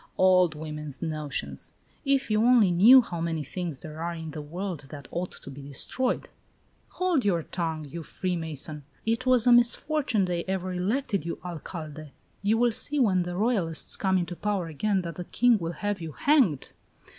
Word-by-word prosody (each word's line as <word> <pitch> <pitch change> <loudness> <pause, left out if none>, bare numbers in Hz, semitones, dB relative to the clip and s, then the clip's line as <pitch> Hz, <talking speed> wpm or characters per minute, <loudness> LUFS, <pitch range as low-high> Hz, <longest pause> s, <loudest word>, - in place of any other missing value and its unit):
"Old 185 -3 +4
women's 150 -1 -5
notions. 145 - -4 0.3
If 275 -4 +1
you 215 0 +3
only 235 -5 +5
knew 225 +10 +8
how 170 -5 -5
many 165 -2 -1
things 165 -1 -5
there 155 0 -8
are 170 0 -2
in 160 -1 -6
the 150 0 -6
world 170 -1 -5
that 140 -3 -9
ought 180 +1 -3
to 140 - -9
be 140 +1 -9
destroyed!" 145 - -1 0.7
"Hold 360 -7 +2
your 175 -5 +1
tongue, 160 -3 -3
you 165 +4 -7
free 180 +3 -3
mason! 155 -2 -4 0.2
It 230 +3 0
was 255 -2 +4
a 245 - +6
misfortune 240 -1 +3
they 175 -1 -2
ever 185 -1 -2
elected 200 - -1
you 170 - -4
Alcalde. 155 -3 -7 0.3
You 210 +3 +2
will 240 0 +3
see 295 +6 -1
when 195 -8 +3
the 175 0 -4
Royalists 195 -7 +1
come 190 -1 +1
into 175 -1 -2
power 200 -1 -1
again 190 +5 -1
that 170 -2 -6
the 180 - -5
king 240 +1 +3
will 165 -1 -3
have 205 0 -3
you 160 -2 -6
hanged!" 250 - +2
180 Hz, 180 wpm, -27 LUFS, 160-215 Hz, 0.7 s, knew